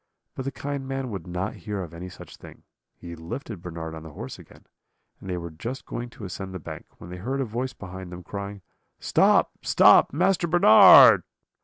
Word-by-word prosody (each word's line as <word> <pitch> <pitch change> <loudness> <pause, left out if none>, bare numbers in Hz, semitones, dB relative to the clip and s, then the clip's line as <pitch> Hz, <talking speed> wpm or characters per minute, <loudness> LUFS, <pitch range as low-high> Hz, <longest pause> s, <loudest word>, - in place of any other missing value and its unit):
But 130 - -7
the 135 - -3
kind 140 0 -6
man 135 -2 -4
would 95 -2 -7
not 90 +4 -4
hear 105 -3 -6
of 85 -2 -11
any 90 +2 -8
such 90 - -13
thing; - - -15 0.3
he 85 -1 -10
lifted 85 - -8
Bernard 85 -2 -7
on 80 - -8
the 80 -1 -12
horse 65 - -8
again, - - -17 0.5
and 95 - -10
they 90 - -2
were 85 -1 -7
just 115 +12 -7
going 120 0 -6
to 115 -3 -11
ascend 95 0 -7
the - - -5
bank, - - -9
when 85 - -11
they 90 - -7
heard 130 +9 -4
a 135 - -1
voice 120 +3 -4
behind 95 -1 -10
them, 90 0 -9
crying: 100 +1 -7 0.4
'Stop, - - +3
stop, - - +5
Master 180 +3 +1
Bernard.' 160 -10 +8
95 Hz, 200 wpm, -25 LUFS, 90-130 Hz, 0.5 s, Bernard